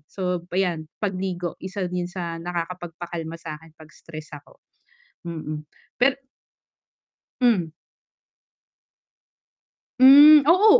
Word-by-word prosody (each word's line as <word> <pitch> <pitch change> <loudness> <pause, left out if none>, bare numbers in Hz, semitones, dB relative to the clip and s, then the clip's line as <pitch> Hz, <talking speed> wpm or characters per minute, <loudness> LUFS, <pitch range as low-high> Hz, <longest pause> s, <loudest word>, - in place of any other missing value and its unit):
So, 180 -2 -3
ayan 175 -4 -1
pagligo, 185 -3 -3
isa 190 0 -4
din 180 0 -3
yun 175 - -8
sa 170 -2 -5
nakakapagpakalma 170 -1 -6
sakin 160 0 -10
'pag 155 -1 -15
stress 155 -2 -11
ako, 145 - -15 0.7
mm. 155 -2 -6 0.3
Pe 270 +2 +1 1.2
Hmm. 190 -10 +2 2.3
Hmm, 290 +3 +9
oo, 370 +5 +5
175 Hz, 95 wpm, -23 LUFS, 165-195 Hz, 2.3 s, Hmm